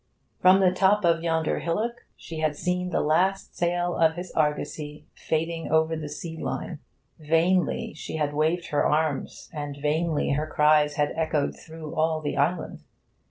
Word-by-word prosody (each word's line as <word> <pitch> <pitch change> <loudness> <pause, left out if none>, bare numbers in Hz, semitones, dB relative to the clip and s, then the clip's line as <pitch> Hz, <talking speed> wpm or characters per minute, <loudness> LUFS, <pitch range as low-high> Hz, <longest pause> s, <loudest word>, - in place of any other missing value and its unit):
From 185 +1 +6
the 185 -1 +5
top 190 +2 +3
of 165 -1 +3
yonder 165 -1 0
hillock 220 +8 -2
she 160 -1 -8
had 155 -1 0
seen 180 +3 -1
the - - 0
last 185 +6 +1
sail 175 0 0
of 160 -1 +3
his 175 +1 -6
argosy 150 0 -2
fading 165 +1 -2
over 160 0 +3
the 155 -2 -5
sea 160 +2 -7
line. - - -4 0.4
Vainly 165 +3 +1
she 155 - -7
had 150 -2 -1
waved 160 +4 0
her 145 - +1
arms, 150 -2 -1
and 145 -2 -5
vainly 155 +1 0
her 150 +2 0
cries 150 -1 +3
had 145 0 0
echoed 160 -3 0
through 160 -1 -9
all 160 0 +1
the 150 -2 -3
island. 160 +5 -1
160 Hz, 160 wpm, -26 LUFS, 150-175 Hz, 0.4 s, From